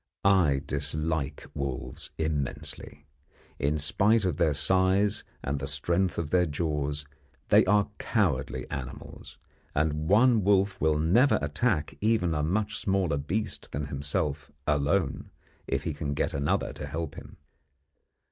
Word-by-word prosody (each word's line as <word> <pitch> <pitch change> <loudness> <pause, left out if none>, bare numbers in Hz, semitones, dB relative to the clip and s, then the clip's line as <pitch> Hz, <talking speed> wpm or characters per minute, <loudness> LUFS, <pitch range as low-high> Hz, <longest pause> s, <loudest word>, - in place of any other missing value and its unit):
I 85 -9 +4
dislike 75 0 -1
wolves 70 -3 -4
immensely. 75 -1 -3 0.5
In 75 +3 +1
spite 100 +9 +2
of 85 -5 0
their 80 -4 +2
size 95 +6 +2 0.2
and 70 +1 -2
the 70 - -4
strength 85 +6 0
of 80 -3 -3
their 90 -1 +3
jaws, 75 -2 -2 0.4
they - - +6
are 105 -1 +4
cowardly 65 - 0
animals, 65 -1 -7 0.4
and 75 +1 0
one 115 +1 +5
wolf 100 0 +2
will 80 -1 +3
never 95 - +4
attack 75 - -1
even 105 -6 +2
a 75 - 0
much 105 +8 0
smaller 95 -7 +1
beast 100 +10 -3
than 75 +1 -2
himself 70 0 -2 0.2
alone, 75 +2 0 0.4
if 70 +1 -1
he 80 - -2
can 70 0 -3
get - - -1
another 70 +1 0
to - - -7
help 80 -1 -4
him. - - -11
75 Hz, 135 wpm, -28 LUFS, 70-95 Hz, 0.5 s, they